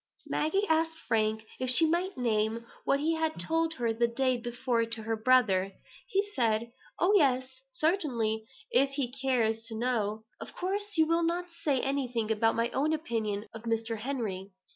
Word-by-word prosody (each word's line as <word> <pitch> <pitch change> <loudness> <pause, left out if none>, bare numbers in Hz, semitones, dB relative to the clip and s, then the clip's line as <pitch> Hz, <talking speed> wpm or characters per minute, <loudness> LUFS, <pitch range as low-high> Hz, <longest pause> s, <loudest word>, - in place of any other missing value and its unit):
Maggie 390 +7 0
asked 320 0 +1
Frank 220 -4 0
if 255 0 0
she 255 +6 +6
might 350 +3 0
name 225 -1 0 0.2
what 275 - +2
he 315 +3 +1
had 320 -1 -1
told 325 0 0
her 235 -4 0
the 235 +1 +2
day 255 +2 +1
before 240 0 -1
to 230 -1 -3
her 225 +1 -1
brother. 215 -5 +3 0.3
He 400 -2 0
said: 230 -2 +1 0.3
"Oh, 370 +4 +3
yes, 260 -5 +2
certainly, 255 - 0 0.2
if 275 - +4
he 270 -4 -1
cares 245 -4 +1
to 225 -1 -5
know. 220 -3 -1 0.2
Of - - -9
course, 405 +2 -2
you 320 - +5
will 330 +1 +2
not 340 +1 0 0.2
say 275 -4 +2
anything 250 -5 -1
about 225 +1 +2
my 230 +1 0
own 300 +4 +1
opinion 220 -9 -2
of 225 - -8
Mr. 225 -1 -1
Henry. 215 -7 -3
250 Hz, 170 wpm, -30 LUFS, 225-315 Hz, 0.3 s, she